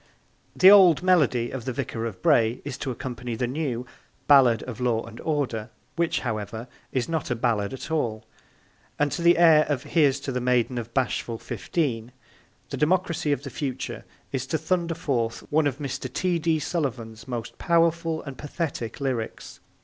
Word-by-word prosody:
the 190 Hz, +1 st, +8 dB
old 185 Hz, -6 st, +7 dB
melody 140 Hz, -10 st, +3 dB
of 130 Hz, -3 st, -6 dB
The 130 Hz, -, -1 dB
Vicar 115 Hz, -1 st, -3 dB
of 95 Hz, -5 st, -9 dB
Bray 115 Hz, +1 st, +3 dB
is 145 Hz, -3 st, -4 dB
to 140 Hz, -, -3 dB
accompany 125 Hz, -1 st, -5 dB
the 125 Hz, +2 st, -1 dB
new 125 Hz, -2 st, -3 dB, 0.4 s
Ballade 130 Hz, -6 st, +6 dB
of 125 Hz, -1 st, -7 dB
Law 120 Hz, -2 st, +1 dB
and 115 Hz, 0 st, -11 dB
Order 130 Hz, -8 st, -2 dB, 0.3 s
which, 170 Hz, -1 st, 0 dB
however, 110 Hz, 0 st, -4 dB, 0.2 s
is 130 Hz, -3 st, -1 dB
not 160 Hz, -5 st, -2 dB
a 120 Hz, -, 0 dB
ballade 110 Hz, -4 st, 0 dB
at 135 Hz, +3 st, -7 dB
all 110 Hz, -8 st, -1 dB, 0.7 s
and 145 Hz, -1 st, +1 dB
to -, -, -3 dB
the 170 Hz, +1 st, +5 dB
air 165 Hz, -3 st, +7 dB
of 140 Hz, -3 st, -1 dB
Here's 145 Hz, -3 st, +2 dB
to 135 Hz, -, -4 dB
the 125 Hz, -1 st, -2 dB
Maiden 125 Hz, 0 st, +1 dB
of 115 Hz, 0 st, -7 dB
Bashful 120 Hz, -2 st, -1 dB
Fifteen 120 Hz, -4 st, -3 dB, 0.6 s
the -, -, -3 dB
democracy 170 Hz, -1 st, +1 dB
of 145 Hz, -, -1 dB
the -, -, -7 dB
future 135 Hz, -3 st, -4 dB, 0.3 s
is 135 Hz, -1 st, -3 dB
to 160 Hz, -, 0 dB
thunder 170 Hz, +1 st, -1 dB
forth 120 Hz, -8 st, -1 dB
one 155 Hz, 0 st, +3 dB
of 135 Hz, -2 st, -2 dB
Mr. 135 Hz, -3 st, -5 dB
T. 175 Hz, +4 st, 0 dB
D. 160 Hz, 0 st, +1 dB
Sullivan's 125 Hz, -8 st, -3 dB
most 120 Hz, -3 st, -5 dB
powerful 165 Hz, -1 st, +1 dB
and 135 Hz, -2 st, -9 dB
pathetic 145 Hz, -7 st, -4 dB
lyrics. 130 Hz, -5 st, -4 dB
135 Hz, 175 wpm, -25 LUFS, 120-160 Hz, 0.7 s, the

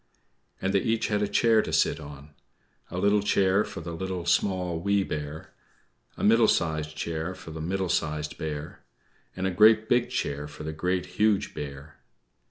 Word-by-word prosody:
And 95 Hz, +1 st, -1 dB
they 100 Hz, -, +4 dB
each 115 Hz, +3 st, 0 dB
had 105 Hz, -1 st, +1 dB
a 105 Hz, -, +1 dB
chair 110 Hz, +2 st, +4 dB
to -, -, -5 dB
sit -, -, +2 dB
on: 75 Hz, -1 st, -11 dB, 0.6 s
a 90 Hz, -, -6 dB
little 100 Hz, +2 st, +3 dB
chair 100 Hz, 0 st, +3 dB
for 100 Hz, -5 st, -7 dB
the 85 Hz, +1 st, -6 dB
Little, 90 Hz, +1 st, -4 dB
Small, 90 Hz, -1 st, +1 dB
Wee 100 Hz, +2 st, +2 dB
Bear; 75 Hz, -2 st, -6 dB, 0.6 s
a -, -, -5 dB
middle 115 Hz, +1 st, +5 dB
sized 80 Hz, -3 st, 0 dB
chair 80 Hz, +3 st, -3 dB
for 80 Hz, -, -10 dB
the 80 Hz, 0 st, -6 dB
Middle 95 Hz, +3 st, -1 dB
Sized 75 Hz, -3 st, -1 dB
Bear; 75 Hz, -1 st, -5 dB, 0.6 s
and 95 Hz, -, -3 dB
a 95 Hz, -, +1 dB
great 110 Hz, +3 st, +5 dB
big 120 Hz, +1 st, +2 dB
chair 70 Hz, +1 st, -2 dB
for 75 Hz, -, -10 dB
the 80 Hz, 0 st, -4 dB
Great, 90 Hz, +3 st, -1 dB
Huge 105 Hz, +2 st, +1 dB
Bear. 70 Hz, +1 st, -8 dB
90 Hz, 175 wpm, -27 LUFS, 80-100 Hz, 0.6 s, middle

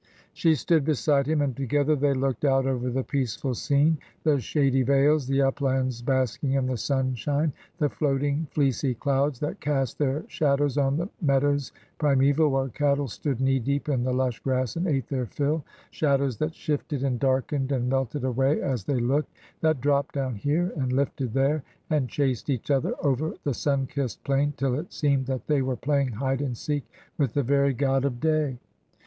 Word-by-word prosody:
'' -, -, -31 dB
She 165 Hz, -2 st, +3 dB
stood 160 Hz, +2 st, +2 dB
beside 145 Hz, -1 st, +2 dB
him, 155 Hz, -1 st, +2 dB
and 135 Hz, -4 st, -1 dB
together 145 Hz, +3 st, +1 dB
they 140 Hz, 0 st, +1 dB
looked 130 Hz, -1 st, -1 dB
out 135 Hz, -2 st, +3 dB
over 125 Hz, -2 st, -1 dB
the 130 Hz, +2 st, -1 dB
peaceful 130 Hz, -1 st, -2 dB
scene— 145 Hz, +5 st, +2 dB, 0.2 s
the 150 Hz, -3 st, +3 dB
shady 135 Hz, +1 st, +1 dB
vales, 140 Hz, +2 st, +3 dB
the 135 Hz, 0 st, +2 dB
uplands 130 Hz, -2 st, 0 dB
basking 130 Hz, +1 st, 0 dB
in 135 Hz, -1 st, +1 dB
the 130 Hz, 0 st, -1 dB
sunshine, 135 Hz, +4 st, 0 dB, 0.2 s
the 150 Hz, -4 st, +2 dB
floating 145 Hz, +2 st, 0 dB
fleecy 135 Hz, -2 st, 0 dB
clouds 140 Hz, +1 st, 0 dB
that 150 Hz, -, -3 dB
cast 135 Hz, -5 st, -1 dB
their 145 Hz, +1 st, 0 dB
shadows 145 Hz, -2 st, +1 dB
on 145 Hz, +4 st, +1 dB
meadows 140 Hz, -2 st, +1 dB, 0.3 s
primeval 145 Hz, +1 st, +3 dB
where 135 Hz, -1 st, 0 dB
cattle 140 Hz, +2 st, +1 dB
stood 130 Hz, +2 st, -3 dB
knee 135 Hz, 0 st, +2 dB
deep 140 Hz, +4 st, -2 dB
in 130 Hz, -4 st, +1 dB
the 130 Hz, -, 0 dB
lush 125 Hz, -2 st, 0 dB
grass 130 Hz, -3 st, -1 dB
and 175 Hz, +3 st, -1 dB
ate 135 Hz, -7 st, 0 dB
their 130 Hz, -3 st, -2 dB
fill 145 Hz, +5 st, -1 dB, 0.2 s
— -, -, -30 dB
shadows 140 Hz, -4 st, +1 dB
that 155 Hz, +1 st, -2 dB
shifted 145 Hz, -2 st, -2 dB
and 130 Hz, -3 st, 0 dB
darkened 135 Hz, +1 st, 0 dB
and 125 Hz, -3 st, 0 dB
melted 135 Hz, +1 st, -1 dB
away 135 Hz, +3 st, +1 dB
as 125 Hz, -8 st, -2 dB
they 135 Hz, -3 st, 0 dB
looked— 135 Hz, +6 st, 0 dB, 0.3 s
that 155 Hz, -5 st, +1 dB
dropped 140 Hz, +1 st, +1 dB
down 135 Hz, -2 st, -1 dB
here, 150 Hz, -, 0 dB
and 130 Hz, -3 st, -1 dB
lifted 130 Hz, -2 st, -1 dB
there, 135 Hz, +5 st, +1 dB, 0.3 s
and 145 Hz, -5 st, +1 dB
chased 135 Hz, -2 st, -1 dB
each 135 Hz, +1 st, -1 dB
other 135 Hz, -2 st, +1 dB
over 145 Hz, +3 st, 0 dB
the 140 Hz, -, 0 dB
sun 140 Hz, +2 st, 0 dB
kissed 130 Hz, -2 st, -4 dB
plain 140 Hz, +1 st, +1 dB
till 135 Hz, 0 st, 0 dB
it 150 Hz, +7 st, -4 dB
seemed 140 Hz, -3 st, +1 dB
that 130 Hz, -1 st, -3 dB
they 150 Hz, -3 st, +2 dB
were 130 Hz, -1 st, -1 dB
playing 140 Hz, 0 st, 0 dB
hide 135 Hz, +4 st, -1 dB
and 130 Hz, -5 st, -3 dB
seek 145 Hz, +1 st, -3 dB, 0.3 s
with 135 Hz, -6 st, 0 dB
the 145 Hz, -, +2 dB
very 140 Hz, +2 st, +3 dB
god 135 Hz, 0 st, +1 dB
of 130 Hz, -4 st, -1 dB
day. 155 Hz, -4 st, +1 dB
140 Hz, 190 wpm, -26 LUFS, 130-145 Hz, 0.3 s, She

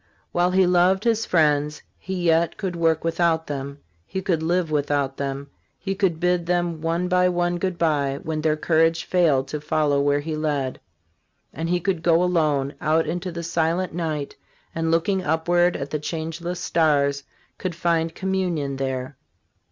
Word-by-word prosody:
While 175 Hz, +1 st, +2 dB
he 185 Hz, +1 st, +4 dB
loved 180 Hz, +2 st, +3 dB
his 225 Hz, -1 st, +1 dB
friends, 150 Hz, -2 st, +2 dB, 0.2 s
he 190 Hz, -2 st, -4 dB
yet 165 Hz, 0 st, +2 dB
could 190 Hz, -4 st, -3 dB
work 165 Hz, -1 st, +1 dB
without 165 Hz, -1 st, +1 dB
them, 140 Hz, 0 st, -6 dB, 0.3 s
he 190 Hz, -, -3 dB
could 180 Hz, -4 st, 0 dB
live 170 Hz, 0 st, 0 dB
without 145 Hz, -2 st, 0 dB
them, 140 Hz, 0 st, -4 dB, 0.3 s
he 195 Hz, -, -3 dB
could 190 Hz, -4 st, 0 dB
bid 180 Hz, -1 st, +1 dB
them 175 Hz, -2 st, 0 dB
one 165 Hz, +2 st, 0 dB
by 180 Hz, 0 st, +3 dB
one 175 Hz, 0 st, 0 dB
good 185 Hz, -1 st, -2 dB
bye, 145 Hz, -5 st, +1 dB
when 155 Hz, -2 st, -2 dB
their 155 Hz, 0 st, +1 dB
courage 165 Hz, +1 st, +2 dB
failed 150 Hz, -7 st, +2 dB
to 150 Hz, -, -4 dB
follow 150 Hz, -2 st, +1 dB
where 145 Hz, 0 st, +2 dB
he 155 Hz, +1 st, -4 dB
led; 145 Hz, -4 st, -2 dB, 0.7 s
and 165 Hz, +3 st, -3 dB
he 180 Hz, 0 st, +2 dB
could 180 Hz, -2 st, -1 dB
go 170 Hz, +1 st, +3 dB
alone, 150 Hz, -6 st, +1 dB
out 160 Hz, +1 st, +2 dB
into 175 Hz, +3 st, -3 dB
the 170 Hz, 0 st, -5 dB
silent 165 Hz, +2 st, 0 dB
night, 155 Hz, -4 st, -3 dB, 0.4 s
and, 165 Hz, 0 st, -1 dB
looking 170 Hz, +4 st, +1 dB
upward 175 Hz, +2 st, +2 dB
at 140 Hz, 0 st, -6 dB
the 155 Hz, -, -1 dB
changeless 165 Hz, +3 st, -4 dB
stars, 145 Hz, -5 st, +2 dB, 0.4 s
could 180 Hz, -3 st, -3 dB
find 165 Hz, -1 st, 0 dB
communion 180 Hz, -8 st, -1 dB
there. 130 Hz, 0 st, -3 dB
165 Hz, 165 wpm, -23 LUFS, 150-175 Hz, 0.7 s, he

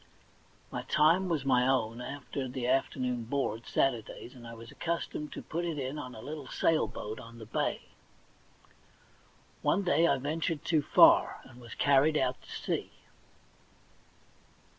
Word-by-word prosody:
My -, -, -3 dB
time 170 Hz, +5 st, +3 dB
was 155 Hz, -5 st, -1 dB
my 125 Hz, -2 st, +4 dB
own 120 Hz, -3 st, +1 dB
after 135 Hz, 0 st, -5 dB
the 125 Hz, -1 st, -4 dB
afternoon 125 Hz, -2 st, 0 dB
board, 115 Hz, -3 st, -2 dB
Saturdays, 120 Hz, -1 st, -1 dB
and 120 Hz, -3 st, -11 dB
I 115 Hz, -, -8 dB
was 115 Hz, 0 st, -11 dB
accustomed 165 Hz, -3 st, -3 dB
to -, -, -7 dB
put 170 Hz, +2 st, -3 dB
it 165 Hz, -3 st, -2 dB
in 135 Hz, +2 st, -3 dB
on 125 Hz, -4 st, -7 dB
a 110 Hz, -, -9 dB
little 145 Hz, 0 st, -6 dB
sail 160 Hz, +4 st, +2 dB
boat 110 Hz, +4 st, -6 dB
on 115 Hz, -1 st, -11 dB
the 110 Hz, -, -9 dB
bay. 110 Hz, -, -1 dB, 1.8 s
One 200 Hz, -, +2 dB
day 170 Hz, -2 st, +4 dB
I 140 Hz, -, +3 dB
ventured 155 Hz, +3 st, -2 dB
too 160 Hz, -3 st, +3 dB
far, -, -, +6 dB
and 125 Hz, -, -15 dB
was 115 Hz, -2 st, -10 dB
carried 145 Hz, +2 st, +4 dB
out 130 Hz, -2 st, 0 dB
to -, -, -17 dB
sea. -, -, -3 dB
135 Hz, 155 wpm, -31 LUFS, 125-155 Hz, 1.8 s, far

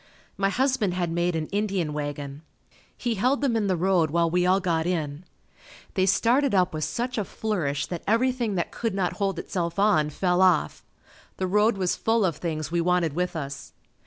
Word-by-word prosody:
My 195 Hz, 0 st, +1 dB
husband 250 Hz, -5 st, +1 dB
had 175 Hz, -2 st, -1 dB
made 175 Hz, +1 st, 0 dB
an 160 Hz, -1 st, -1 dB
Indian 195 Hz, -6 st, -1 dB
wagon. 145 Hz, -1 st, -5 dB, 0.6 s
He 240 Hz, -2 st, -1 dB
held 250 Hz, +7 st, +1 dB
them 265 Hz, -5 st, +1 dB
in 215 Hz, -3 st, +1 dB
the 185 Hz, -, +2 dB
road 175 Hz, -2 st, +2 dB
while 170 Hz, +2 st, +2 dB
we 180 Hz, +1 st, +2 dB
all 185 Hz, +1 st, +4 dB
got 170 Hz, -3 st, 0 dB
in. 160 Hz, -2 st, -2 dB, 0.7 s
They 190 Hz, -1 st, +1 dB
started 240 Hz, +5 st, +3 dB
up 180 Hz, -2 st, +2 dB
with 155 Hz, 0 st, -3 dB
such 245 Hz, 0 st, -2 dB
a -, -, 0 dB
flourish 180 Hz, -10 st, -2 dB
that 175 Hz, -2 st, -5 dB
everything 235 Hz, -1 st, +1 dB
that 170 Hz, -, -2 dB
could 225 Hz, -4 st, -3 dB
not 185 Hz, -3 st, 0 dB
hold 195 Hz, -2 st, -1 dB
itself 170 Hz, -1 st, -3 dB
on, 195 Hz, -7 st, +3 dB
fell 180 Hz, +4 st, +1 dB
off. 75 Hz, -, +2 dB, 0.5 s
The 190 Hz, -, -1 dB
road 210 Hz, +3 st, +2 dB
was 185 Hz, -2 st, 0 dB
full 225 Hz, -2 st, +1 dB
of 170 Hz, -5 st, -1 dB
things 155 Hz, -2 st, -4 dB
we 170 Hz, 0 st, +1 dB
wanted 175 Hz, -3 st, +1 dB
with 180 Hz, +2 st, -2 dB
us. 140 Hz, -3 st, -6 dB
180 Hz, 190 wpm, -25 LUFS, 165-210 Hz, 0.7 s, all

